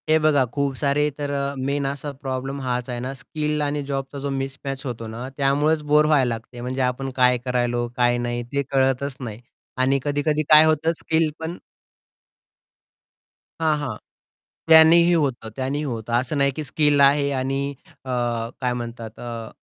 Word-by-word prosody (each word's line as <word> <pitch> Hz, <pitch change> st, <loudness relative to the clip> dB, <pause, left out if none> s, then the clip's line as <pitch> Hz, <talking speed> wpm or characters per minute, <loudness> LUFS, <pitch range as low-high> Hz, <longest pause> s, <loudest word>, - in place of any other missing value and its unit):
हे 155 Hz, -, +6 dB
बघा 155 Hz, -3 st, +3 dB
खूप 140 Hz, -2 st, -1 dB
सारे 145 Hz, +2 st, +1 dB
तर 145 Hz, -1 st, -3 dB, 0.3 s
मेन 140 Hz, +2 st, -1 dB
असा 140 Hz, +1 st, -3 dB
प्रॉब्लेम 135 Hz, 0 st, -5 dB
हाच 125 Hz, -1 st, -2 dB
आहे 120 Hz, -1 st, -3 dB
ना 130 Hz, +2 st, -4 dB
स्किल 150 Hz, +2 st, -3 dB
आणि 145 Hz, 0 st, -1 dB
जॉबचा 135 Hz, 0 st, -4 dB
जो 140 Hz, +1 st, -3 dB
मिसमॅच 135 Hz, 0 st, -5 dB
होतो 115 Hz, -3 st, -5 dB
ना 115 Hz, +3 st, -6 dB
त्यामुळेच 145 Hz, +3 st, +2 dB
बोर 150 Hz, 0 st, +6 dB
व्हायला 150 Hz, -4 st, +3 dB
लागते, 115 Hz, +1 st, -6 dB
म्हणजे 130 Hz, +2 st, -3 dB
आपण 130 Hz, +1 st, -1 dB
काय 125 Hz, -1 st, +4 dB
करतो 120 Hz, -1 st, 0 dB
आहे, -, -, -7 dB
काय 120 Hz, 0 st, +3 dB
नाही? 120 Hz, 0 st, -2 dB
ते 140 Hz, +4 st, -2 dB
कळतच 135 Hz, 0 st, +1 dB
नाही. 115 Hz, -3 st, -7 dB, 0.4 s
आणि 130 Hz, +2 st, +2 dB
कधी-कधी 150 Hz, +1 st, 0 dB
काय 155 Hz, +1 st, +9 dB
होतं 160 Hz, +1 st, +2 dB
स्किल 160 Hz, 0 st, +1 dB
पण 165 Hz, +2 st, -5 dB, 2.0 s
हां, 160 Hz, -1 st, +2 dB
हां. 130 Hz, -7 st, -4 dB, 0.7 s
त्यांनीही 165 Hz, +2 st, +7 dB
होतं. 135 Hz, -8 st, 0 dB
त्यांनीही 135 Hz, +3 st, -2 dB
होतं. 115 Hz, -3 st, -4 dB
असं 125 Hz, +5 st, 0 dB
नाही 140 Hz, 0 st, +3 dB
की 155 Hz, -, -3 dB
स्किल 150 Hz, 0 st, +2 dB
आहे 140 Hz, +1 st, +4 dB
आणि 135 Hz, +2 st, -2 dB, 0.3 s
अ, 130 Hz, -, -4 dB, 0.5 s
काय 125 Hz, -1 st, 0 dB
म्हणतात 115 Hz, -2 st, -7 dB
अ, 115 Hz, -2 st, -6 dB
135 Hz, 165 wpm, -23 LUFS, 125-150 Hz, 2.0 s, काय